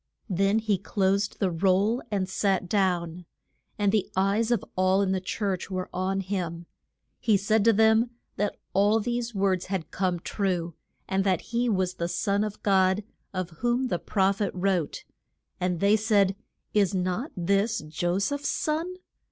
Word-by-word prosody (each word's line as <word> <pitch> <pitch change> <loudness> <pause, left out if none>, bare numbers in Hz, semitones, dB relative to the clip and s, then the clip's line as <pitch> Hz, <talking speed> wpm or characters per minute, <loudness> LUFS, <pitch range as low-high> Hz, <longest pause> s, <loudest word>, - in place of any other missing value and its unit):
Then 195 +3 +2
he 215 -4 +1
closed 200 0 0
the 190 -2 0
roll 195 +7 +2
and 195 -3 -1
sat 190 -1 0
down. 175 -3 0 0.5
And 205 -1 +2
the 210 -2 +1
eyes 200 +4 +2
of 240 -4 +1
all 185 +1 +3
in 190 - 0
the 190 -1 0
church 190 0 -2
were 185 -1 -3
on 190 +2 -1
him. 175 -3 -3 0.5
He 215 -3 +3
said 205 +2 +2
to 230 - +7
them 220 +2 +4 0.3
that 205 +1 -1 0.2
all 205 +3 +4
these 240 0 -2
words 190 -2 +1
had 185 -5 -3
come 185 -2 0
true, 175 -3 -2 0.3
and 190 0 +1
that 190 -3 +1
he 240 +1 +2
was 185 -3 +1
the 170 - -3
Son 200 +4 0
of 210 -1 -5
God, 190 0 +3 0.3
of 185 -2 -3
whom 245 +2 +1
the 175 - -1
proph 195 +3 +1
et 200 - +1
wrote. 180 -4 -1 0.6
And 180 -1 -1
they 200 +3 +4
said, 205 -3 +3 0.4
Is 200 -2 +2
not 185 - -1
this 200 +5 +1
Jo 175 +4 -2
seph's 285 +8 -1
son? 325 +4 -1
195 Hz, 165 wpm, -27 LUFS, 185-215 Hz, 0.6 s, to